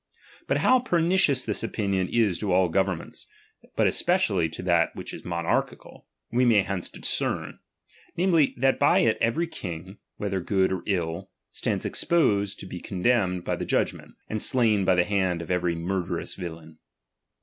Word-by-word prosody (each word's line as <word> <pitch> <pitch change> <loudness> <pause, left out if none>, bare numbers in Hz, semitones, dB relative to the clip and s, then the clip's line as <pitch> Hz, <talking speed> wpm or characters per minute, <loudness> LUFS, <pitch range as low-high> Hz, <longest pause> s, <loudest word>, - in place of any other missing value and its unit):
But - - 0
low 255 0 +5
pernicious 170 - +2
this 105 - -2
opinion 100 -4 -1
is 110 -6 +1
to 105 -3 -2
all 90 0 +3
governments, 95 -1 -2 0.5
Tint - - +4
especially 105 - +2
to 80 - -8
that 85 -2 +2
which - - -7
is - - -9
monarchical, 85 -1 -3 0.2
we 125 +2 +2
may 110 -5 +4
hence 95 -2 -3
discern; - - -3 0.6
namely, 170 -5 +3
that 135 +2 +2
by - - +4
it 115 - +2
every 120 +10 +1
Icing, 95 - -7 0.2
"whether 100 -2 -2
good 95 0 +1
or 95 - -2
ill, 90 -2 -2 0.2
stands - - -2
exposed 105 - +1
to - - -8
be 90 -1 -7
con 90 -2 -6
demned 95 -8 +2
by - - 0
the - - -4
judgment, - - -2
and 110 -1 -2
slain 110 -6 +2
by 95 - +4
the 90 0 +3
hand 95 -4 0
of 85 +1 -6
every 90 -1 0
murderous 90 +2 -3
villain. 80 -2 -9
95 Hz, 165 wpm, -26 LUFS, 90-115 Hz, 0.6 s, low